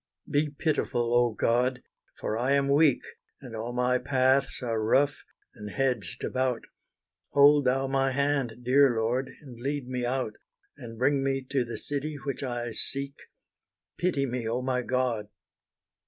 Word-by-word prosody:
Be 150 +1 +1
pitiful, 140 -5 -1
oh 120 -2 +3
God! 125 +2 +1 0.4
for 110 - -2
I 125 +4 +1
am 140 0 +2
weak, 145 -2 +4 0.4
And 125 -5 -9
all 115 +2 -4
my 125 +1 +1
paths 130 +1 +1
are 115 -2 -1
rough, 140 +6 +2 0.3
and 105 0 -8
hedged 125 -8 -2
about, 130 -2 -1 0.7
Hold 145 0 +6
Thou 135 +2 +2
my 135 0 +1
hand 135 -3 -1
dear 130 0 +4
Lord, 120 +4 0
and 125 -6 -12
lead 140 +1 -3
me 125 -1 -3
out, 120 -3 -2 0.4
And 115 -1 -10
bring 135 +3 +2
me 135 -1 -1
to 135 -2 +2
the 120 -1 -6
city 145 +1 -3
which 140 -2 -5
I 120 -3 -3
seek, 140 +5 -2 0.9
Pity 165 -6 +1
me, 125 -3 -3
oh 125 +2 -1
my 125 -1 0
God! 120 -4 -1
130 Hz, 155 wpm, -28 LUFS, 120-140 Hz, 0.9 s, Hold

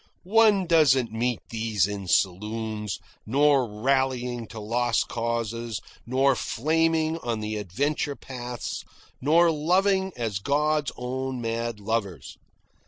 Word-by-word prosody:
One 210 0 +4
doesn't 135 -8 +4
meet 120 +1 -1
these 110 -4 +1
in 100 -2 -5
saloons, 105 +3 -1 0.3
nor 140 +1 +3
rallying 125 +1 0
to 110 - -9
lost 115 +2 0
causes, 115 -1 -2 0.3
nor 135 +2 +3
flaming 160 +5 +1
on 120 -6 -2
the 105 0 -3
adventure 140 - -1
paths, 125 -3 -6 0.4
nor 165 +5 +5
loving 190 +5 +2
as 110 -5 -2
God's 150 +4 +1
own 130 +1 -3
mad 115 -1 -3
lovers. 100 - -3
120 Hz, 110 wpm, -26 LUFS, 110-150 Hz, 0.4 s, nor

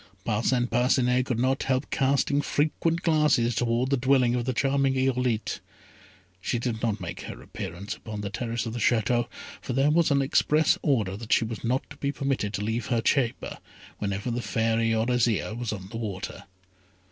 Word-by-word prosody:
Parcin 120 +3 +1
Parcinet 125 +1 +2
could 120 - -1
not 130 +3 +1
help 130 +1 0
casting 140 +1 +2
frequent 160 +3 0
glances 150 -7 +3
towards 120 +3 0
the 140 - +3
dwelling 130 -1 +3
of 120 -1 -1
the 130 - 0
charming 135 +1 +1
Irolite. 125 -4 0 0.8
She 120 - -1
did 115 -2 -2
not 110 -2 0
make 90 -3 -6
her - - -8
appearance 90 +5 -6
upon 105 -2 -7
the 100 -1 -4
terrace 115 0 -3
of 115 - -4
the 120 - -4
Château, 120 +1 +2 0.3
for 130 - -4
there 135 +4 +3
was 170 +1 +3
an 140 -1 +3
express 150 +3 +3
order 110 -10 +1
that 115 +1 -9
she 115 - +4
was 110 -1 -6
not 125 +3 0
to 145 - -10
be 140 -1 -1
permitted 135 -7 -1
to 105 - -3
leave 110 +1 -2
her 120 - +1
chamber, 120 0 0 0.4
whenever 100 +3 -2
the 120 +1 -2
Fairy 115 +1 +1
or 110 0 +1
Azire 115 -6 +1
was 120 -1 -3
on 95 -2 -6
the 115 - -6
water. 105 -4 -5
120 Hz, 185 wpm, -27 LUFS, 110-135 Hz, 0.8 s, she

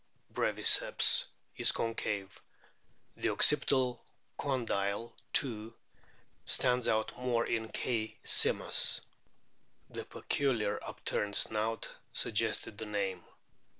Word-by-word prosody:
breviceps - - +5 0.3
is - - +3
concave; 105 -4 -4 0.8
the - - -1
occipital 130 -2 +2 0.3
condyle 115 -5 -3 0.2
too 115 -4 +5 0.7
stands 125 -1 0
out 110 0 -1
more 120 -2 -1
in 110 -1 -3
K. 110 -3 -4
simus. - - +2 0.9
The - - -4
peculiar 110 -7 -2
upturned 100 -1 -4
snout 110 +1 -1 0.3
suggested 105 -2 -1
the 110 - -6
name. 100 -4 -4
110 Hz, 85 wpm, -31 LUFS, 105-125 Hz, 0.9 s, breviceps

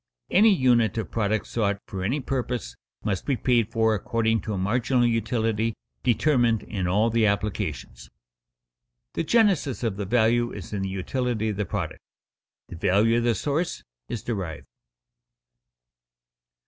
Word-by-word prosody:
Any 215 +4 +6
unit 120 - +3
of 110 - -3
product 110 -1 0
sought 100 -3 0
for 95 -1 -5
any 125 +10 0
purpose 125 - -3 0.3
must 100 -3 -1
be 140 -3 0
paid 115 -3 +2
for 110 -1 +2
according 115 +2 0
to 110 - -4
a - - -3
marginal 120 +6 +1
utility 115 -1 0 0.3
determined 120 -2 +2
in 95 -4 -3
all 105 +6 +2
the 115 -1 +3
applications. 100 -10 -3 1.0
The - - -1
genesis 180 - +2
of 110 -4 -1
the 100 - -3
value 120 +2 +2
is 105 0 -8
in 100 - -2
the 95 - -2
utility 110 +3 -2
of 105 - -3
the 105 - -1
product; 95 -7 -4 0.7
the 85 - -9
value 105 +7 +3
of - - -2
the 120 -2 +2
source 150 - -2 0.3
is 115 - -4
derived. 95 -10 -4
115 Hz, 150 wpm, -25 LUFS, 100-120 Hz, 1.0 s, Any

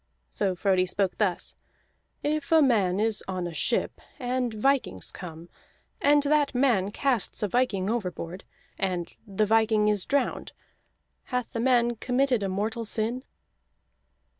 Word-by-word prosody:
So 195 -3 0
Frodi 185 0 +2
spoke 190 0 -1
thus: 190 -5 0 0.7
"If 300 0 -1
a 325 - +7
man 200 -8 +2
is 220 0 +1
on 185 -2 -3
a 175 - -5
ship, - - 0 0.2
and 250 -2 -1
vikings 220 - 0
come, 170 -2 -9 0.5
and 290 0 +5
that 290 -1 +2
man 240 -7 +2
casts 245 -1 -1
a - - +2
viking 200 -3 0
overboard, 185 -5 -3 0.4
and 180 -3 -2
the 205 +1 +1
viking 220 -1 +3
is 205 -3 0
drowned 280 -2 -1 0.7
hath 250 -2 -3
the 230 - -2
man 240 -1 +2
committed 250 0 +1
a 195 - -1
mortal 215 +5 -2
sin?" 230 +3 -2
220 Hz, 140 wpm, -27 LUFS, 190-250 Hz, 0.7 s, a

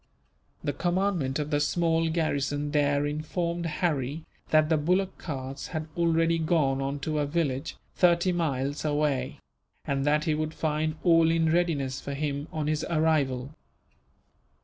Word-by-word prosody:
The 145 - -1
commandant 175 -4 0
of 150 0 -3
the 145 - +2
small 165 +1 +1
garrison 145 -3 -1
there 145 -1 +2
informed 170 +3 -2
Harry 150 -2 -1 0.2
that 155 0 +4
the 160 - +3
bullock 180 +5 +1
carts 135 -3 -5
had 160 -2 -4
already 165 -1 +2
gone 155 -5 +1
on 135 +1 -2
to 155 +1 -1
a 145 - 0
village, 145 -3 -2 0.2
thirty 175 0 +3
miles 145 -5 -1
away; 145 -2 0 0.5
and 140 -2 -1
that 150 +1 +2
he 155 - +1
would 155 +1 -2
find 155 0 -1
all 165 -2 +5
in 165 -1 +2
readiness 150 -7 0
for 140 - -5
him, 145 0 -2
on 155 -2 -2
his 150 0 0
arrival. 150 -5 +1
155 Hz, 150 wpm, -27 LUFS, 145-165 Hz, 0.5 s, all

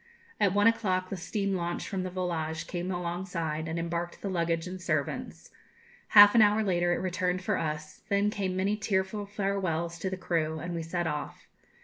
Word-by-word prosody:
At 200 -1 +3
one 205 0 +4
o'clock 185 -5 +2
the - - -1
steam 195 +2 -2
launch 175 -1 -2
from 195 -2 -2
the 185 - -3
'Volage' 165 -3 -2
came 175 +1 -4
alongside 175 -3 -3
and 160 +1 -3
embarked 170 +1 -3
the 200 - -1
luggage 170 -2 0
and 185 0 -6
servants. - - -3 0.7
Half 205 0 +11
an 230 - +6
hour 210 +1 +5
later 175 -3 +1
it 175 - +2
returned 185 0 -1
for 205 +1 +1
us; 155 -2 -4
then 200 +1 +2
came 190 -3 -2
many 195 +3 +1
tearful 205 -1 -1
farewells 190 -5 -2
to 190 - -2
the 190 - -4
crew, 160 -3 -1
and 170 +2 -5
we 170 - -2
set 175 +2 -2
off. 150 -2 -4
180 Hz, 190 wpm, -29 LUFS, 170-195 Hz, 0.7 s, Half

